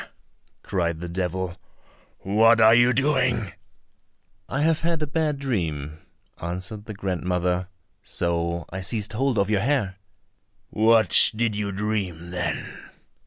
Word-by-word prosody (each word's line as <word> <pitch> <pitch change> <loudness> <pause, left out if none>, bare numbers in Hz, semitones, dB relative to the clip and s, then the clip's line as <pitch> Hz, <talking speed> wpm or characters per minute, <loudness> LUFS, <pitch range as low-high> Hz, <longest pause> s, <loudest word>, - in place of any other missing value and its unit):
cried 85 -4 -1
the 90 - -5
devil, 90 0 -3 0.7
"what 110 +3 +4
are 110 0 +7
you 120 +2 +5
doing?" 125 -6 +1 1.0
"I 135 - -1
have 160 0 +2
had 165 0 0
a - - +1
bad 150 0 -1
dream," 80 - -3 0.4
answered 95 +5 -5
the 110 - -7
grandmother, 90 -1 -1 0.3
"so 85 0 -1
I 95 +1 -5
seized 105 +2 0
hold 130 +1 0
of 100 +1 +1
your 100 -2 +2
hair." 110 -7 0 0.7
"What 110 -3 +5
did 115 -1 0
you 105 -1 -2
dream 95 -4 -3
then?" 90 -1 -4
100 Hz, 125 wpm, -24 LUFS, 90-115 Hz, 1.0 s, are